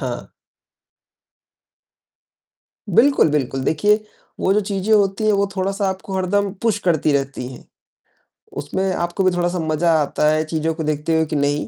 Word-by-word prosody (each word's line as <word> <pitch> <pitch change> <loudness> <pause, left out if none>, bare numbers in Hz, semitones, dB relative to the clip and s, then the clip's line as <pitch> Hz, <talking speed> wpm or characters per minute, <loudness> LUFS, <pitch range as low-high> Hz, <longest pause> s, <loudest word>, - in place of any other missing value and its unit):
हाँ। - - -5 2.6
बिल्कुल, 245 - +4
बिल्कुल। 135 -2 -1
देखिए 205 +9 +2 0.4
वो 190 - +2
जो 210 - +3
चीजें 200 +1 -2
होती 200 0 +2
हैं, 215 - +4
वो 200 0 +2
थोड़ा-सा 195 +1 -1
आपको 190 +1 -5
हरदम 195 +2 0
पुश 220 -3 +1
करती 155 -3 +2
रहती 135 -2 -2
हैं, - - -12 0.9
उसमें 190 0 -2
आपको 175 +3 -1
भी 185 - +4
थोड़ा-सा 175 0 -1
मजा 160 +1 +1
आता 150 +1 0
है 155 0 +2
चीज़ों 160 0 -1
को 160 0 -5
देखते 150 +2 -1
हुए 160 0 +2
कि 150 - -4
नहीं, 145 +1 0
175 Hz, 155 wpm, -20 LUFS, 155-195 Hz, 2.6 s, बिल्कुल